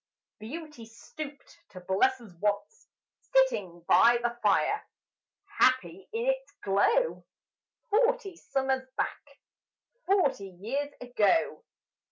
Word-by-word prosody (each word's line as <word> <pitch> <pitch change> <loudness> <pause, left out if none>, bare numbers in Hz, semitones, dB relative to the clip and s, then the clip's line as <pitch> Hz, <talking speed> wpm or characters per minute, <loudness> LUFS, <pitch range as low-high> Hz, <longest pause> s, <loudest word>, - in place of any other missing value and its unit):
Beauty 275 +1 -8
stooped 280 +5 -10
to 185 - -10
bless 200 +9 +2
us 220 -6 -14
once, 205 0 -2 0.3
Sitting 205 - +1
by 240 0 +6
the 240 0 0
fire, 410 - +2 0.8
Happy 260 +9 +2
in 455 +2 -2
its - - -1
glow; 460 - +2 0.7
Forty 465 -3 +2
summers 265 -4 -1
back - - -4 0.7
Forty 355 - +2
years 275 +8 -2
ago. 250 - +1
265 Hz, 100 wpm, -29 LUFS, -, 0.8 s, by